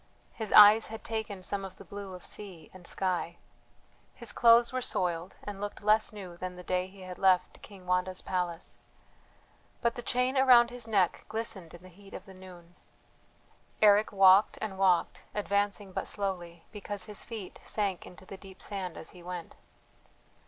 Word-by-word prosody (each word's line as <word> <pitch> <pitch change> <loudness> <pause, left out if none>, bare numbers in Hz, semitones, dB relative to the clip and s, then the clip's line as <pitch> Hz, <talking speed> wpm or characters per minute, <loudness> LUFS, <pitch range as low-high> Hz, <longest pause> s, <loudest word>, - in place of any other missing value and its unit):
His 220 -2 -5
eyes 210 +1 +9
had 225 0 -8
taken 220 -4 -4
some 195 +1 -2
of 190 -1 -8
the 200 - -14
blue 200 0 -8
of 180 - -12
sea 185 -7 -7
and 185 -2 -12
sky. 180 -2 -2 0.8
His 235 -3 -6
clothes 235 +1 +5
were 255 - -1
soiled, 175 -6 -1
and 205 -1 -7
looked 205 0 -6
less 215 +1 +3
new 190 -5 -9
than 180 0 -6
the 180 - -10
day 180 0 -1
he 190 0 -15
had 185 -1 -9
left 185 -2 +2
King 195 -3 -13
Wanda's 180 0 0
palace. 175 -2 -3 1.0
But 235 -1 +1
the 240 - -6
chain 250 +2 0
around 245 -3 +6
his 245 -2 -5
neck 195 -5 +1
glistened 215 -6 -2
in 175 - -15
the 185 - -13
heat 195 +2 -14
of - - -9
the 195 - -13
noon. 180 -2 -14 1.0
Eric 210 0 +5
walked 195 +1 +6
and 195 -3 -5
walked, 185 -3 +2
advancing 205 -1 -1
but - - -4
slowly, 175 -4 -4
because 205 -1 -5
his 210 -1 -4
feet 215 -6 -8
sank 200 -4 -2
into 185 +1 -14
the 195 - -9
deep 190 -1 -14
sand 190 -4 -3
as - - -8
he 180 - -14
went. 175 -1 -7
195 Hz, 175 wpm, -30 LUFS, 180-210 Hz, 1.0 s, eyes